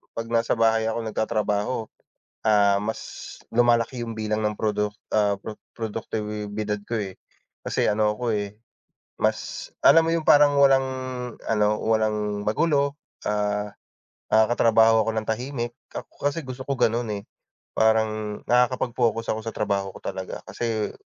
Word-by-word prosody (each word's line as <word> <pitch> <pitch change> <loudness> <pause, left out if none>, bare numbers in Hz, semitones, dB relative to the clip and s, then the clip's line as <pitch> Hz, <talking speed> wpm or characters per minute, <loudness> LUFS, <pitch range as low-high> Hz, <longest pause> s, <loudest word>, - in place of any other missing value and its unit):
'pag 115 0 -4
nasa 115 0 +2
bahay 110 0 +3
ako, 115 - -2
nagtatrabaho, 110 +1 -1 0.6
ah, 100 -2 +4
mas 110 +1 -3 0.5
lumalaki 120 +1 +3
yung 115 - -5
bilang 110 0 -1
ng 105 - +1
produk 105 -1 0 0.2
ah, 105 -2 +2 0.4
produktibidad 105 -1 -3
ko, 115 - -1
eh, 95 -2 -6 0.5
kasi - - 0
ano 105 0 +2
ako, 120 -1 -1
eh, 105 0 -4 0.6
mas - - -1
alam 165 0 +7
mo - - +1
yung 165 -2 -2
parang 145 -1 +6
walang 135 -1 +6 0.7
ano, 105 -1 +2
walang 105 -2 0
magulo, 140 +4 +1 0.3
ah, 105 0 -1 0.6
nakakatrabaho 115 0 +5
ako 115 - 0
ng 110 - -3
tahimik 120 +1 -2 0.2
ako 145 - -3
kasi 165 - -4
gusto 130 0 -7
ko 140 - 0
ganun, 115 0 +2
eh, 100 -1 -4 0.5
parang 110 -1 +1
nakakapag-focus 120 -2 +1
ako - - -4
sa 115 - -4
trabaho 100 -2 -1
ko - - -11
talaga 95 0 -5
kasi 115 -3 -2
110 Hz, 135 wpm, -25 LUFS, 105-120 Hz, 0.7 s, alam